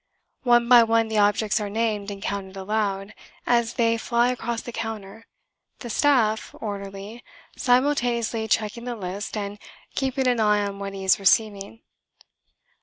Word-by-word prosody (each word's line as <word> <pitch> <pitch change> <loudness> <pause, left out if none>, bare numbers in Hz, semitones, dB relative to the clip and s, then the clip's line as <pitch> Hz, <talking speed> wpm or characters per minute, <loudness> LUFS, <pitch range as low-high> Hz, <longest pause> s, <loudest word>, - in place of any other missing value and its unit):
One 240 -2 +4
by 245 -1 +8
one 225 0 +2
the 220 -1 +1
objects 205 +1 +2
are 205 - -3
named 210 -1 -1
and 200 -1 -7
counted 195 -1 -4
aloud, 195 0 -2 0.3
as 235 -1 +1
they 230 -1 +2
fly 235 +2 +2
across 235 -2 -3
the 240 - -7
counter, 225 -1 -6 0.5
the 240 - -7
staff 230 -6 +2
orderly 200 +2 -7 0.3
simultaneously 245 -4 +1
checking 225 +2 -1
the 245 -1 -3
list 200 +1 -5
and 205 0 -5 0.3
keeping 265 -1 -1
an 245 -2 +2
eye 210 -1 +3
on 200 0 -5
what 200 0 -5
he 195 - -6
is 190 - +4
receiving. 200 +1 +1
220 Hz, 150 wpm, -24 LUFS, 200-235 Hz, 0.5 s, by